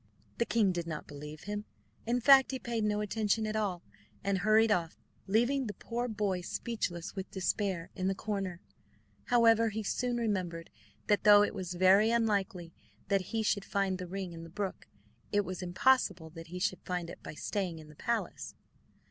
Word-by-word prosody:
The 235 - +1
king 215 -5 +3
did 170 -2 -3
not 155 -2 -5
believe 150 +1 -9
him; 210 +1 -4 0.4
in 245 +1 +1
fact 270 +2 +7
he 265 - -2
paid 235 -3 -2
no 210 0 +1
attention 215 +1 0
at 215 0 -3
all, 200 -5 -1 0.4
and 195 -1 +1
hurried 215 +2 +4
off, 170 -4 0 0.3
leaving 240 +6 +2
the 205 - -5
poor 240 +4 -3
boy 205 -5 -1
speechless 175 -4 -4
with 190 -1 -5
despair 190 -2 -1
in 185 -1 -1
the 195 - +1
corner. 195 -4 -3 0.6
However, 230 -2 +5
he 220 +1 -4
soon 245 +4 -1
remembered 185 -7 -2 0.3
that 205 - +2
though 205 -1 +8
it - - -1
was 185 -3 -5
very 190 +4 +5
unlikely 205 -6 0 0.4
that 195 -2 +2
he 225 -1 -1
should 200 -1 +1
find 195 -2 -1
the 180 - -5
ring 190 -1 -5
in 165 - -8
the 165 - -9
brook, 195 +2 -4 0.4
it 205 -1 +2
was 185 0 -5
impossible 185 -3 +2
that 165 0 -10
he 180 +2 -7
should 180 0 -1
find 180 -2 -3
it - - -11
by - - -8
staying 185 -1 -2
in 155 -1 -11
the 150 - -14
palace. 235 +8 -3
200 Hz, 185 wpm, -31 LUFS, 180-220 Hz, 0.6 s, though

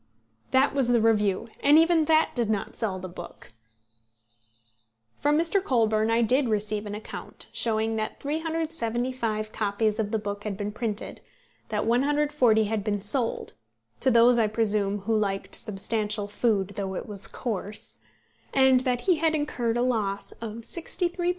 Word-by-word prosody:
'" 110 0 -43
That 265 +2 +3
was 270 -3 +2
the 245 -1 +4
review, 210 -2 +2
and 290 +2 +5
even 325 -1 +4
that 315 0 +3
did 235 -4 0
not 210 -2 -2
sell 200 -4 -2
the 185 0 -6
book! 175 -7 -10 1.7
From 295 +1 +2
Mr. 340 +4 +1
Colburn 220 - +2
I 230 +1 +3
did 255 +3 +2
receive 210 0 -1
an 205 - -5
account, 215 - -7
showing 220 -1 +1
that 215 0 -3
375 255 -8 -2
copies 210 +1 0
of 210 -2 0
the 220 - 0
book 205 -1 -5
had 205 -3 -4
been 205 0 -3
printed, 220 -1 -4 0.5
that - - -1
140 265 -2 +3
had 215 -1 -2
been 205 -1 -1
sold, 225 +4 -1 0.5
to 265 - +3
those, 235 0 +5
I 220 - +3
presume, 205 -2 0
who 220 +3 0
liked 200 -2 -1
substantial 210 0 -2
food 205 -2 0
though 195 -1 -4
it - - -4
was 200 -2 -5
coarse, 210 -3 -4 0.6
and 265 -1 +6
that 250 -1 0
he 365 -4 +2
had 320 0 +2
incurred 240 -6 -1
a 240 - +2
loss 210 -5 -1
of 225 -2 -7
£63, 345 - -1
10s. - - +4
225 Hz, 165 wpm, -26 LUFS, 210-260 Hz, 1.7 s, and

